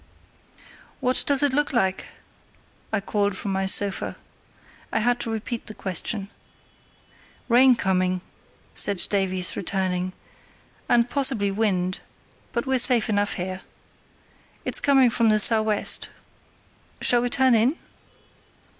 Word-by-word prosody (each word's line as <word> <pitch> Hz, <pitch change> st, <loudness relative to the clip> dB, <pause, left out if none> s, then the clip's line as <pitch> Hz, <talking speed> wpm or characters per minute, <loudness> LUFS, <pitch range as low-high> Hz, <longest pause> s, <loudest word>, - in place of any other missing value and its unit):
"What 255 Hz, -1 st, +1 dB
does 285 Hz, -1 st, +2 dB
it 285 Hz, -2 st, +3 dB
look 290 Hz, +1 st, 0 dB
like?" 190 Hz, -5 st, -1 dB, 0.8 s
I 220 Hz, -, 0 dB
called 200 Hz, -1 st, -2 dB
from 200 Hz, -, -4 dB
my 190 Hz, 0 st, -1 dB
sofa. 195 Hz, 0 st, +1 dB, 0.7 s
I -, -, -1 dB
had 240 Hz, +2 st, +1 dB
to -, -, -3 dB
repeat 225 Hz, +2 st, -5 dB
the 215 Hz, -, -9 dB
question. 195 Hz, +2 st, -4 dB, 1.2 s
"Rain 255 Hz, +1 st, +5 dB
coming," 185 Hz, -3 st, 0 dB, 0.5 s
said 200 Hz, -2 st, +1 dB
Davies, 185 Hz, -2 st, 0 dB
returning, 185 Hz, -1 st, -2 dB, 0.8 s
"and 235 Hz, 0 st, +3 dB
possibly 260 Hz, -8 st, 0 dB
wind; 190 Hz, -3 st, -1 dB, 0.5 s
but 235 Hz, -, -3 dB
we're 265 Hz, -1 st, +2 dB
safe 245 Hz, -2 st, +5 dB
enough 205 Hz, -1 st, 0 dB
here. 185 Hz, +1 st, -5 dB, 1.0 s
It's -, -, -1 dB
coming 270 Hz, -4 st, +3 dB
from 230 Hz, -1 st, +2 dB
the 215 Hz, 0 st, +3 dB
sou' 220 Hz, +1 st, +6 dB
west; 215 Hz, -1 st, 0 dB, 0.9 s
shall 240 Hz, -1 st, +2 dB
we 245 Hz, -, -1 dB
turn 260 Hz, +1 st, +2 dB
in?" 235 Hz, +6 st, +3 dB
215 Hz, 125 wpm, -23 LUFS, 190-245 Hz, 1.2 s, sou